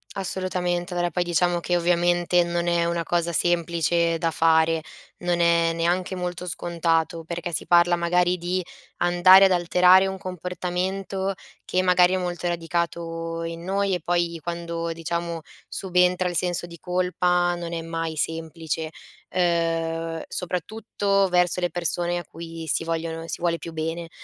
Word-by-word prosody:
Assolutamente, 180 -2 -2
allora 175 0 0
poi 180 0 -1
diciamo 175 0 +1
che 175 +1 -1
ovviamente 175 0 +2
non 170 0 -2
è 170 -1 +2
una 170 0 0
cosa 170 0 0
semplice 170 -1 +1
da 165 - +1
fare, 160 0 +3 0.4
non 175 -1 0
è 170 -1 +3
neanche 175 +3 0
molto 180 0 -4
scontato, 165 -1 -1
perché 170 +1 -5
si - - -3
parla 175 0 +5
magari 180 +1 +1
di 180 +2 -2 0.3
andare 180 +2 +7
ad 190 - +3
alterare 180 +1 +5
un 190 0 -4
comportamento 185 +2 -3 0.3
che, 185 - +1
magari, 180 0 +4
è - - +2
molto 175 -1 -3
radicato 165 -1 -3
in 165 0 -6
noi 195 +1 0
e 175 - -5
poi 170 0 0
quando, 170 0 -4
diciamo, 170 0 -3 0.3
subentra 180 -1 +1
il 175 - -5
senso 175 -1 -1
di 170 -1 -11
colpa, 180 0 +1
non 170 -1 -6
è 165 - -3
mai 165 -1 -4
semplice. 160 0 -3 0.4
Uhm, 165 -2 0
soprattutto 195 +2 -1
verso 180 0 +2
le 175 -2 -1
persone 175 +1 -1
a - - -7
cui 165 +1 -9
si - - +1
vogliono 165 0 -3
si - - -3
vuole 170 -1 +1
più 165 - -8
bene. 165 +1 -4
175 Hz, 150 wpm, -24 LUFS, 165-180 Hz, 0.4 s, andare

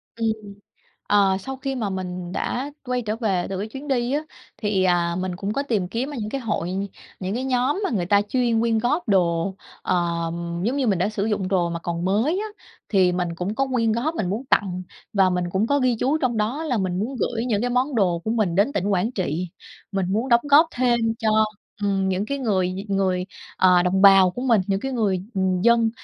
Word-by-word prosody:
Ừm. 225 -1 0 0.8
Ờ, 195 -2 +4
sau 265 +6 -6
khi 270 0 -3
mà 220 -6 -2
mình 180 -1 -5
đã 265 +8 -2
quay 250 -1 -1
trở 215 0 -2
về 195 -7 0
từ 190 - -3
cái 210 +3 -3
chuyến 270 +6 -8
đi 245 -1 0
á, 295 - +1 0.4
thì, 205 -3 0
à, 175 -1 +2
mình 185 -1 -3
cũng 200 +2 -3
có 280 +5 -1
tìm 215 -10 -1
kiếm 240 +8 -3
ở 285 - -6
những 210 - -3
cái 275 - -3
hội, 210 -7 -2 0.5
những 190 +3 -3
cái 255 +2 -2
nhóm 260 +8 +1
mà - - 0
người 185 -7 -1
ta 200 +1 +4
chuyên 235 +1 +1
quyên 230 -1 +2
góp 250 +5 0
đồ, 175 -1 +2 0.3
ờm, 170 -1 -1
giống 245 +6 0
như 270 -3 +1
mình 195 -4 +2
đã 185 - +1
sử 210 -1 -2
dụng 205 -4 -1
đồ 180 -3 +1
mà 170 - -3
còn 170 +1 -4
mới 225 - +1
á, 435 - -3 0.4
thì 185 -4 +3
mình 180 -1 -1
cũng 180 +5 -3
có 270 +2 +1
quyên 230 -3 +2
góp, 275 +9 -1
mình 185 - -2
muốn 225 +7 -3
tặng 185 -3 +1 0.3
và 190 -2 +4
mình 180 0 0
cũng 195 +5 +1
có 285 +2 +2
ghi 255 -3 +2
chú 285 +5 +2
trong 250 -5 0
đó 235 +9 -1
là 265 -6 0
mình 185 -2 -1
muốn 250 +6 -3
gửi 235 0 -1
những 215 -5 0
cái 245 +1 -1
món 255 +3 +1
đồ 180 -6 +2
của 220 - -1
mình 215 -7 +1
đến 205 +9 +2
tỉnh 200 0 -1
Quảng 195 +7 +1
Trị. 180 - -2 0.4
Mình 195 -2 0
muốn 225 +5 0
đóng 235 -1 +5
góp 305 +4 +7
thêm 245 -1 +2 0.2
cho, 220 -1 +1 0.5
ừm, 195 -1 +1
những 190 +2 -1
cái 280 +3 -2
người 190 -7 0
người, 190 -2 0 0.3
ờ, 180 -1 +5
đồng 190 +2 +1
bào 195 -2 +8
của 245 +7 -6
mình, 230 -6 +4
những 205 +7 -1
người, 195 -6 0
ừm, 190 -1 +1
dân, 230 -1 +4
205 Hz, 230 wpm, -23 LUFS, 185-245 Hz, 0.8 s, bào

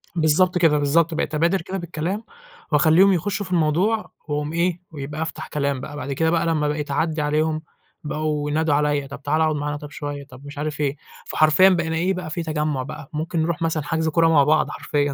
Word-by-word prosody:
بالضبط 170 +3 +3
كده، 160 -4 +4
بالضبط. 155 +4 +2
بقيت 155 -1 -2
أبادر 170 +5 +2
كده 190 +3 -5
بالكلام، 175 +4 -3 0.5
وأخليهم 160 +6 +5
يخشّوا 200 +3 -1
في 185 - -11
الموضوع، 180 +7 +1 0.2
وأقوم 150 +1 -2
إيه، 175 +1 0
ويبقى 150 +1 -6
أفتح 160 - -4
كلام 140 -2 -1
بَقى 145 +3 -7
بعد 140 0 -4
كده 160 +4 +1
بَقى 170 0 +1
لما 155 -3 +1
بقيت 150 -1 -2
أعدّي 155 +2 0
عليهم 155 +1 0 0.4
بقوا 150 -1 -2
ينادوا 160 0 +1
عليَّ، 145 -1 +1
طَب 140 - -9
تعالى 155 +2 +2
اقعد 155 -1 +1
معانا 145 0 -2
طَب 145 0 -10
شوية، 145 -1 -5
طَب 135 0 -14
مش 145 +1 -10
عارف 150 0 -3
إيه، 140 -1 0 0.3
فحرفيًا 155 +5 +5
بقينا 165 -3 0
إيه 180 +4 +1
بَقى 180 -3 -5
في 165 +2 -3
تجمُّع 150 -4 -1
بَقى، 140 0 -9
ممكن 160 +2 -1
نروح 165 +1 -1
مثلًا 160 -2 0
حجز 160 0 -1
كورة 165 +1 +3
مع 150 -3 +5
بعض 155 +2 +3
حرفيًا 145 -1 -1
155 Hz, 205 wpm, -22 LUFS, 145-165 Hz, 0.5 s, وأخليهم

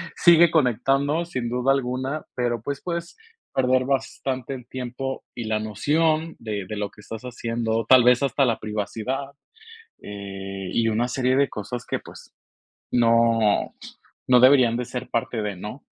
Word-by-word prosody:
sigue 170 0 +6
conectando, 140 +3 +1
sin 125 -8 -4
duda 125 +2 +1
alguna, 130 +3 -2
pero, 120 -2 -1
pues, 140 +4 -4
puedes 170 0 -5 0.4
perder 130 -1 +2
bastante 135 -1 -2
el 125 -3 -9
tiempo 130 +1 -5
y 120 - -4
la 110 0 0
noción 155 +10 0
de 105 -3 -4
de 105 - -4
lo 105 -1 -2
que 105 - -16
estás 110 +2 -8
haciendo, 115 -2 -2
tal 130 -2 +8
vez 125 +2 +4
hasta 135 +1 +2
la 115 -3 0
privacidad, 110 +6 -4 0.7
eh, 95 -1 -7
y 115 -1 +2
una 115 +2 0
serie 130 0 +1
de 140 0 +3
cosas 110 +4 -6
que, - - -2
pues, - - -14 0.6
no 115 -2 +3 0.5
no 125 -1 +6
deberían 130 -2 +6
de 125 - -3
ser 125 +1 -6
parte 115 -1 -2
de, 105 -2 -3
¿no? 105 +9 -8
125 Hz, 160 wpm, -24 LUFS, 110-135 Hz, 0.7 s, tal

